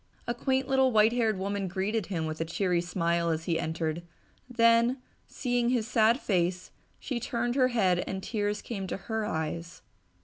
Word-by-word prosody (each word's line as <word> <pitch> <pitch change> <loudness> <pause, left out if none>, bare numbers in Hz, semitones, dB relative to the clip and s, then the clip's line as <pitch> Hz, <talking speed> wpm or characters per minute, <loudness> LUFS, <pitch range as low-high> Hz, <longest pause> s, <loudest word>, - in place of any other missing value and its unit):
A 240 - -1
quaint 260 +2 0
little 265 -1 +3
white 220 0 +4
haired 225 -4 +1
woman 200 +1 -2
greeted 195 +3 -2
him 165 -5 -2
with 155 0 -4
a - - +3
cheery 175 +1 0
smile 170 -1 0
as 160 0 -1
he 165 -1 0
entered, 160 0 -2 0.5
then, 230 +1 +4 0.3
seeing 245 -2 0
his 240 -3 0
sad 230 +1 +3
face, 180 -4 -1 0.3
she 255 -4 -3
turned 240 0 -1
her 255 -1 +4
head 190 -8 +2
and 190 0 -4
tears 210 -2 -2
came 195 -5 -5
to - - -3
her 220 +1 -3
eyes. 165 +2 -4
205 Hz, 175 wpm, -29 LUFS, 175-235 Hz, 0.5 s, white